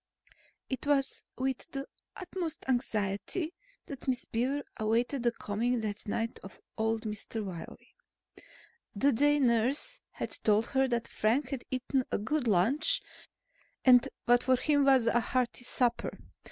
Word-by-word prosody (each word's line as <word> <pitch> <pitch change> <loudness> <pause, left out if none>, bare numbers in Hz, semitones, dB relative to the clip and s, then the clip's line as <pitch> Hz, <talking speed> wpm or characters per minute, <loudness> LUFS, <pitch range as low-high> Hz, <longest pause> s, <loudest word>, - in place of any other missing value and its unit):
It 260 +2 -4
was 275 -2 +1
with 265 +3 -2
the 275 -3 -4 0.3
utmost 360 -3 -5
anxiety 240 - -1 0.3
that 275 0 -8
Miss 255 -2 0
Beaver 265 +5 -1
awaited 235 +5 +1
the 240 0 +2
coming 235 +3 -1
that 210 -1 -4
night 225 +2 -2
of 195 - -12 0.2
old 225 0 0
Mr. 215 0 -4
Wiley. 175 -4 -9 1.0
The 275 +8 +3
day 290 +4 +3
nurse 255 - +2
had - - -5
told 215 +1 +4
her 265 -1 +3
that 235 -2 -1
Frank 245 +6 +1
had 265 -3 -4
eaten 260 +1 0
a - - +1
good 250 +5 -1
lunch 265 - +3 0.9
and 250 -2 +7 0.2
what 245 0 +5
for 260 0 +5
him 285 +2 +2
was 265 -4 +5
a 235 +1 +3
hearty 245 +1 -1
supper. 245 -1 0
245 Hz, 140 wpm, -31 LUFS, 225-275 Hz, 1.0 s, and